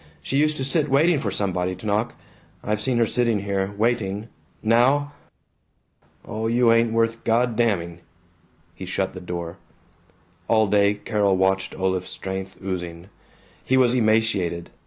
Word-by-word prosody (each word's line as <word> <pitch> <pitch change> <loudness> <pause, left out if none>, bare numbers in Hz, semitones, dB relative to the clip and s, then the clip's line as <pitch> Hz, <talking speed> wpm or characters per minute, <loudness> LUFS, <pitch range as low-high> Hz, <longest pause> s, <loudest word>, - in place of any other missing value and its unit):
She 135 - -1
used 155 +1 +2
to 135 - -2
sit 150 +3 +1
waiting 150 +4 +3
for - - -2
somebody 90 -2 -1
to 90 - -12
knock. 105 +2 -1 0.5
I've 105 0 -1
seen 125 +1 0
her 115 - +4
sitting 115 -2 0
here, 100 -1 -2
waiting. 110 -2 -1 0.3
Now 130 +6 +3 1.1
Oh, 110 +1 -3
you 120 0 +3
ain't 115 0 +3
worth 115 0 0
God 120 +1 +1
damning." 90 -7 0 0.7
He 90 +2 -9
shut 95 +1 -2
the 90 - -8
door. 85 0 -6 0.9
All 110 -1 +4
day 100 0 +3
Carol 105 -2 0
watched 95 0 0
Olaf's 95 -1 -1
strength 95 0 -5
oozing. 90 -1 -5 0.5
He 130 - +2
was 125 -2 +4
emaciated. 110 -7 +1
105 Hz, 145 wpm, -23 LUFS, 95-120 Hz, 1.1 s, her